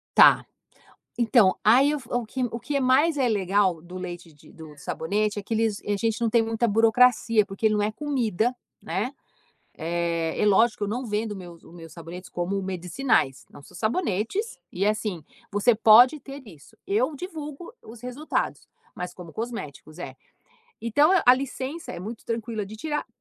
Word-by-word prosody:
Tá. -, -, +7 dB, 0.7 s
Então, 230 Hz, -5 st, +4 dB
aí 265 Hz, +8 st, +5 dB
o -, -, -2 dB
fo 245 Hz, -1 st, -3 dB
que 255 Hz, +3 st, -4 dB
o 235 Hz, 0 st, -3 dB
que 280 Hz, -1 st, -2 dB
mais 285 Hz, +5 st, +3 dB
é 255 Hz, -3 st, +2 dB
legal 195 Hz, -4 st, +1 dB
do 180 Hz, +2 st, -10 dB
leite 175 Hz, -2 st, -7 dB
de 145 Hz, -, -19 dB
do 155 Hz, -2 st, -12 dB
sabonete, 205 Hz, +9 st, -2 dB
é 205 Hz, -, -4 dB
que 215 Hz, -, -8 dB
eles 220 Hz, -2 st, 0 dB
a 205 Hz, 0 st, 0 dB
gente 225 Hz, +2 st, -1 dB
não 230 Hz, -1 st, +1 dB
tem 230 Hz, 0 st, +4 dB
muita 225 Hz, +1 st, 0 dB
burocracia, 225 Hz, 0 st, +4 dB
porque 200 Hz, +2 st, -2 dB
ele 215 Hz, -, +3 dB
não 210 Hz, -, +1 dB
é 210 Hz, +1 st, 0 dB
comida, 245 Hz, -5 st, -1 dB, 0.3 s
né, 225 Hz, +8 st, -2 dB, 0.7 s
eh, 170 Hz, 0 st, -1 dB
e -, -, +3 dB
lógico 210 Hz, +1 st, +3 dB
eu -, -, -5 dB
não 245 Hz, +5 st, -3 dB
vendo 210 Hz, -1 st, -2 dB
meus 175 Hz, -3 st, -11 dB
os -, -, -16 dB
meus 165 Hz, -2 st, -11 dB
sabonetes 175 Hz, +2 st, -9 dB
como 190 Hz, +3 st, -2 dB
medicinais, 180 Hz, -, 0 dB
não, -, -, -13 dB
são -, -, -16 dB
sabonetes, 230 Hz, -, -1 dB
e 190 Hz, +3 st, -1 dB
assim, 210 Hz, -5 st, -1 dB, 0.3 s
você 210 Hz, +3 st, +3 dB
pode 240 Hz, +7 st, +7 dB
ter 275 Hz, +1 st, -10 dB
isso. 155 Hz, -7 st, -16 dB
Eu 250 Hz, +9 st, +1 dB
divulgo 315 Hz, -, -7 dB
os 225 Hz, +1 st, -12 dB
resultados, 250 Hz, +5 st, -3 dB, 0.3 s
mas 180 Hz, 0 st, -5 dB
como 175 Hz, -3 st, -11 dB
cosméticos, 175 Hz, -, -7 dB
é. 180 Hz, -, -7 dB, 0.7 s
Então 290 Hz, +8 st, +3 dB
a 250 Hz, -, +8 dB
licença 275 Hz, +4 st, -5 dB
é -, -, -7 dB
muito 220 Hz, +4 st, -7 dB
tranquila 225 Hz, -2 st, -3 dB
de 210 Hz, -, -10 dB
tirar, 295 Hz, +5 st, -3 dB
220 Hz, 175 wpm, -25 LUFS, 185-250 Hz, 0.7 s, a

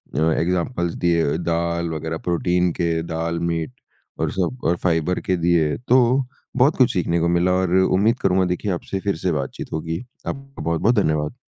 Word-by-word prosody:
अ, -, -, +1 dB
examples 85 Hz, +1 st, -1 dB
दिए 85 Hz, -2 st, +3 dB
दाल 85 Hz, 0 st, -1 dB
वगैरह, 80 Hz, 0 st, -3 dB
protein 90 Hz, +1 st, +1 dB
के 85 Hz, -2 st, 0 dB
दाल, 85 Hz, +1 st, -2 dB
मीट 85 Hz, +4 st, -2 dB, 0.5 s
और -, -, 0 dB
सब 95 Hz, +7 st, -2 dB
और 85 Hz, +2 st, +2 dB
फाइबर 85 Hz, 0 st, +1 dB
के 95 Hz, -, +2 dB
दिए, 85 Hz, -3 st, +2 dB
तो 125 Hz, +1 st, +3 dB, 0.3 s
बहुत 135 Hz, +5 st, +4 dB
कुछ 125 Hz, -2 st, +4 dB
सीखने 85 Hz, -2 st, 0 dB
को 85 Hz, -, +1 dB
मिला 85 Hz, +1 st, +2 dB
और 90 Hz, -1 st, +1 dB
उम्मीद 100 Hz, +6 st, +2 dB
करूँगा 95 Hz, 0 st, +2 dB
देखिए 90 Hz, +3 st, -2 dB
आपसे 95 Hz, +2 st, -3 dB
फिर 100 Hz, -1 st, -1 dB
से 90 Hz, +2 st, -1 dB
बातचीत 70 Hz, -4 st, -4 dB
होगी। 80 Hz, +2 st, -3 dB, 0.3 s
आपका 135 Hz, 0 st, -6 dB
बहुत-बहुत 85 Hz, +9 st, +2 dB
धन्यवाद। 75 Hz, 0 st, 0 dB
85 Hz, 170 wpm, -22 LUFS, 85-95 Hz, 0.5 s, बहुत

